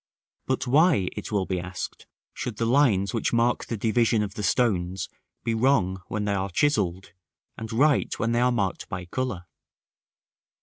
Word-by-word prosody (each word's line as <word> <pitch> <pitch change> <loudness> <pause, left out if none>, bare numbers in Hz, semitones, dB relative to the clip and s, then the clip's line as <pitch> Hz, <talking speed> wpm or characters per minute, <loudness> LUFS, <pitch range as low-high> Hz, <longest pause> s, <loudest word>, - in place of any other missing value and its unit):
§ - - -73
III. - - -61
But 130 -1 0
why, 140 - +4
it - - -6
will 100 -3 +1
be 90 -1 -2
asked, 90 +1 -6 0.3
should 120 -4 -5
the 115 - 0
lines 115 -6 +3
which 115 - 0
mark 120 +1 +1
the 115 - -4
division 115 0 +2
of 100 -2 -5
the 105 - -5
stones 95 -3 0 0.4
be 115 - 0
wrong 110 -6 +2
when 105 -1 -2
they 100 - 0
are 95 0 -1
chiselled, 95 - 0 0.4
and 110 -1 -7
right 140 +5 +3
when 115 - 0
they 120 +1 +2
are 125 0 +3
marked 100 -6 -2
by 90 0 -5
color? 125 -2 -3
110 Hz, 180 wpm, -26 LUFS, 95-125 Hz, 0.4 s, why